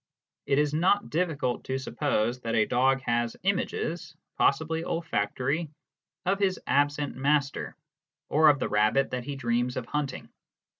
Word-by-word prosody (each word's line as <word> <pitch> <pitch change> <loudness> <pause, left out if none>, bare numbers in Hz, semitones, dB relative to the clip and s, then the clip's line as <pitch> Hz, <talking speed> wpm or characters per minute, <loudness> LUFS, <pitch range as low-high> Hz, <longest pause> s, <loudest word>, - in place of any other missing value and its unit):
It 135 - +2
is 150 0 +2
not 185 +6 +2
difficult 155 -7 -1
to 130 - -2
suppose 125 -3 -1
that 115 -2 -2
a 110 -1 +4
dog 135 +2 +2
has 120 -2 -1
images 175 -4 -2 0.2
(possibly 160 +3 +1
olfactory) 155 0 -1 0.6
of 195 +2 +1
his 190 -2 +1
absent 145 0 +1
master, 140 +1 0 0.5
or 155 +1 +5
of 145 - +4
the - - -1
Tabbit 110 +6 +2
that 125 -1 -3
he 145 0 -4
dreams 120 -1 -1
of 125 - -3
hunting. 145 0 -4
140 Hz, 145 wpm, -28 LUFS, 125-160 Hz, 0.6 s, or